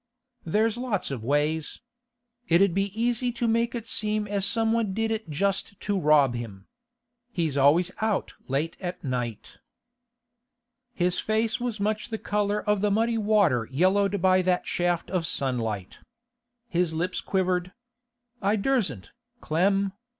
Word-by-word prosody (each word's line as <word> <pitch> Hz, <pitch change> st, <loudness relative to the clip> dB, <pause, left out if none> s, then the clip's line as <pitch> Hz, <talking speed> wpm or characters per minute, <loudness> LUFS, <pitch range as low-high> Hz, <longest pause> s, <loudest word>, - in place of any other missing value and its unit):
'There's 220 Hz, +6 st, +1 dB
lots 240 Hz, -, -2 dB
of 125 Hz, -5 st, -4 dB
ways. 145 Hz, +4 st, 0 dB, 0.7 s
It 170 Hz, +1 st, +4 dB
'ud 195 Hz, -2 st, +4 dB
be 195 Hz, +2 st, +1 dB
easy 245 Hz, +1 st, +1 dB
to 235 Hz, 0 st, -1 dB
make 230 Hz, +1 st, +1 dB
it 230 Hz, -2 st, -4 dB
seem 215 Hz, -1 st, -1 dB
as 200 Hz, -1 st, 0 dB
somebody 225 Hz, 0 st, +1 dB
did 225 Hz, +3 st, -1 dB
it 220 Hz, -5 st, -3 dB
just 195 Hz, +5 st, -1 dB
to 205 Hz, -, -1 dB
rob 150 Hz, -5 st, +4 dB
him. 105 Hz, -5 st, -7 dB, 0.7 s
He's 165 Hz, -, -1 dB
always 155 Hz, +6 st, +4 dB
out 215 Hz, -3 st, 0 dB
late 140 Hz, +5 st, -1 dB
at 180 Hz, -1 st, -5 dB
night.' 120 Hz, -5 st, -4 dB, 1.3 s
His 180 Hz, -6 st, 0 dB
face 220 Hz, +1 st, 0 dB
was 240 Hz, -3 st, -3 dB
much 210 Hz, +1 st, -1 dB
the 225 Hz, -, -3 dB
colour 210 Hz, 0 st, -1 dB
of 210 Hz, -1 st, +2 dB
the 210 Hz, -, +2 dB
muddy 225 Hz, +3 st, +1 dB
water 200 Hz, -, +3 dB
yellowed 195 Hz, +7 st, +2 dB
by 185 Hz, 0 st, +5 dB
that 180 Hz, 0 st, +1 dB
shaft 175 Hz, -1 st, -1 dB
of 180 Hz, -4 st, 0 dB
sunlight. 115 Hz, -10 st, -2 dB, 0.7 s
His 175 Hz, -5 st, 0 dB
lips 180 Hz, +3 st, -2 dB
quivered. 185 Hz, -1 st, 0 dB, 0.7 s
'I 200 Hz, +2 st, +2 dB
dursn't, 200 Hz, -, -1 dB, 0.3 s
Clem. 195 Hz, +4 st, +1 dB
195 Hz, 145 wpm, -26 LUFS, 160-215 Hz, 1.3 s, by